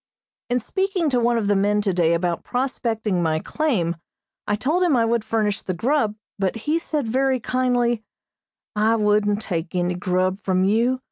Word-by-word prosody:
In 245 +1 +2
speaking 380 - -1
to 250 - +2
one 240 0 +2
of 220 - 0
the 205 0 +2
men 205 +1 +2
today 175 -5 +2
about 170 0 -1
prospecting 230 -7 -1
my 160 -2 +1
claim, 185 - -1 0.5
I 205 - +2
told 295 - 0
him 345 -6 +3
I 230 - +3
would 230 -1 +1
furnish 215 -2 0
the 185 - -4
grub, 225 - +1 0.2
but 195 +1 0
he 315 +3 +2
said 300 -6 -2
very 260 +2 +1
kindly, 245 -2 0 0.7
"I 215 +2 +3
wouldn't 210 -1 +2
take 170 -3 -3
any 180 0 +1
grub 185 +1 0
from 185 -1 +1
you. 230 +6 +2
220 Hz, 175 wpm, -22 LUFS, 190-250 Hz, 0.7 s, him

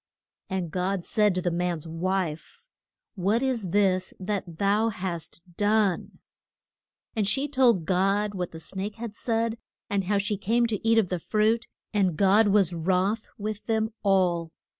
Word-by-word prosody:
And 185 -4 -2
God 185 0 -1
said 210 -4 +2
to 180 - -1
the 175 - +1
man's 170 -2 -2
wife, 175 - -3 0.5
What 205 +5 +1
is 240 -8 -1
this 185 -1 +1
that 190 -4 -4
thou 205 +4 +2
hast 170 -5 -4
done? 205 -2 +1 1.0
And 210 -3 +1
she 270 +8 +1
told 250 - +3
God 195 +3 +1
what 180 -3 -3
the 160 - -10
snake 195 +5 -4
had 230 -2 -6
said, 230 0 -1 0.3
and 200 -2 0
how 200 +2 +1
she 200 +1 -1
came 230 +5 +2
to 220 -3 -2
eat 225 0 +5
of 210 -5 +3
the 180 - -1
fruit, 220 +5 +1 0.3
and 190 -6 +1
God 200 +3 +5
was 195 -3 +3
wroth 185 +6 0
with 215 0 -4
them 220 -1 0
all. 180 -4 +2
200 Hz, 160 wpm, -26 LUFS, 180-220 Hz, 1.0 s, eat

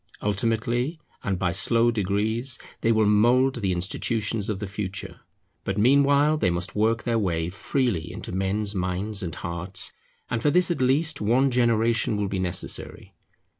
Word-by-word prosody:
Ultimately, 115 - 0 0.2
and 95 -2 -1
by 90 -1 0
slow 115 +5 +3
degrees, 110 +4 -1 0.2
they 115 - +2
will 110 -1 +3
mould 120 +6 +4
the 100 -5 -1
institutions 105 +4 -1
of 105 - -1
the 105 - -4
future; 100 0 -6 0.4
but 95 - -3
meanwhile 140 +6 +4
they 95 - +2
must 85 +2 -2
work 110 +2 +1
their 115 -1 +1
way 85 -4 -1
freely 110 - -1
into - - -7
men's 100 +2 -1
minds 95 +3 -2
and 85 -4 -4
hearts, 85 +2 -4 0.3
and 115 -1 -2
for 145 - +3
this 180 +2 +3
at 170 - -2
least 140 +3 +1
one 125 +6 +3
generation 115 -2 +2
will 105 -1 -1
be 95 -1 -2
necessary. 90 -2 -4
110 Hz, 160 wpm, -25 LUFS, 95-120 Hz, 0.4 s, mould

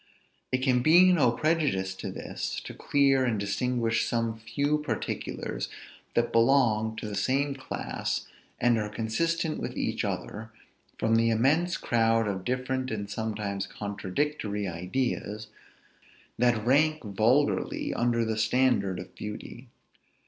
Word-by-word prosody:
It 130 0 0
can 125 -2 +3
be 175 +6 +7
no 140 -9 +4
prejudice 140 - 0
to - - -5
this, - - -4
to - - -8
clear 135 -2 +3
and 115 -5 0
distinguish 115 +3 0
some 115 -1 0
few 145 +6 0
particulars 150 - -3 0.5
that 120 0 +2
belong 115 -3 +3
to 110 - -5
the 105 - -5
same 140 +6 +1
class, 135 -1 -3 0.3
and 120 -2 +3
are 105 -1 -2
consistent 155 +10 -1
with - - -5
each - - -1
other, 110 +1 -4 0.5
from 110 0 +2
the 115 0 +3
immense 145 +10 +2
crowd 115 -1 +2
of 95 -2 -3
different 130 +1 -1
and 100 -3 -4
sometimes 105 -3 -3
contradictory 105 +1 -3
ideas, 105 +4 -3 0.9
that 120 -3 +2
rank 155 +4 +3
vulgarly 110 +8 +1
under 120 -1 +1
the 110 -1 -1
standard 110 -5 +2
of 90 - -9
beauty. 110 +4 -8
115 Hz, 130 wpm, -28 LUFS, 105-135 Hz, 0.9 s, be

